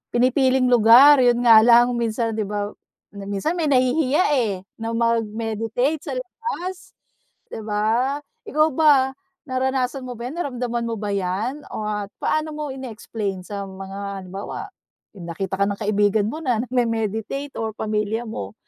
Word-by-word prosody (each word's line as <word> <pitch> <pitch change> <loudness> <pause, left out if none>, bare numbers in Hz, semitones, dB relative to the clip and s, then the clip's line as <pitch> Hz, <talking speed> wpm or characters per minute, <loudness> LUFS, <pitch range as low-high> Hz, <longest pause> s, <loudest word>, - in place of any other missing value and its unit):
pinipiling 255 +1 +3
lugar 245 +5 +8
yun 245 -1 +3
nga 225 -2 +9
lang 240 +1 +6
minsan, 230 -1 -1
'di 215 - -1
ba, 205 0 -3 0.4
minsan 200 - -3
may 325 -4 0
nahihiya, 265 +4 +3 0.2
eh, 215 -4 0 0.3
na 225 0 -2
mag-meditate 230 +4 -1
sa 295 - -5
labas, 370 - -6 0.5
'di - - -6
ba? 220 +6 0 0.3
Ikaw 305 +2 +3
ba, 275 -3 +4 0.4
naranasan 260 0 -1
mo 250 - -6
ba 235 - -6
yan 290 - -8
naramdaman 245 -6 -2
mo 230 - -2
ba 210 0 -3
yan 200 +9 -2
o 215 - -4
at 210 -1 -3
paano 310 0 0
mo 300 0 -4
ine-explain 220 -6 -5
sa 200 0 -5
mga 195 +1 -7
halimbawa 195 - -6 0.5
yung 185 - -10
nakita 190 +3 -3
ka - - +4
ng 200 - -4
kaibigan 205 0 +2
mo 310 - -5
na 245 -6 +1
nagme-meditate 230 +2 -2
or 225 -1 -1
pamilya 215 +1 -1
mo, 100 - -6
230 Hz, 150 wpm, -22 LUFS, 210-260 Hz, 0.5 s, nga